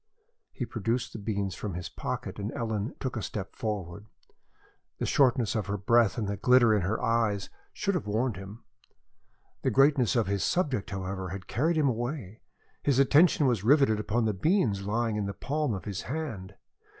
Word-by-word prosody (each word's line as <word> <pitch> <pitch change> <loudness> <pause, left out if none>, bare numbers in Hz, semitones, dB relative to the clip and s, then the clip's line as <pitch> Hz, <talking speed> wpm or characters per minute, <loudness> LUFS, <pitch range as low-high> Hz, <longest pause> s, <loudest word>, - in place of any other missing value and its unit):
He 125 - -4
produced 115 +2 -2
the - - -6
beans 100 -2 -2
from 100 -2 -5
his 90 -2 -4
pocket - - -5
and 100 +3 -3
Ellen 110 0 -3
took 130 -2 -3
a 110 - -2
step 100 -1 -5
forward. 105 -2 -4 0.9
The - - -2
shortness 125 -5 +3
of 110 -3 -2
her 100 0 -1
breath 115 +3 +3
and 110 -4 -1
the 100 0 -2
glitter 120 +2 +5
in 105 - +2
her 95 +5 -1
eyes 115 -4 0 0.2
should 200 - -1
have 170 - -2
warned 110 +2 0
him. 95 +4 -10 1.0
The - - +1
greatness 135 -4 +4
of 115 -3 +3
his 100 0 -1
subject, 140 - 0
however, 95 -1 -4
had 95 +1 -6
carried 160 +7 0
him 150 -2 +3
away. 120 -3 -3 0.4
His 140 -3 +2
attention 145 +3 +5
was 120 -7 +1
riveted 135 -3 +4
upon 110 +2 0
the 110 - +1
beans 115 - +1
lying 115 0 0
in 105 -1 -1
the 100 - -5
palm 145 - -1
of 95 - -7
his 100 -3 -4
hand. 115 -10 -5
110 Hz, 185 wpm, -28 LUFS, 100-130 Hz, 1.0 s, glitter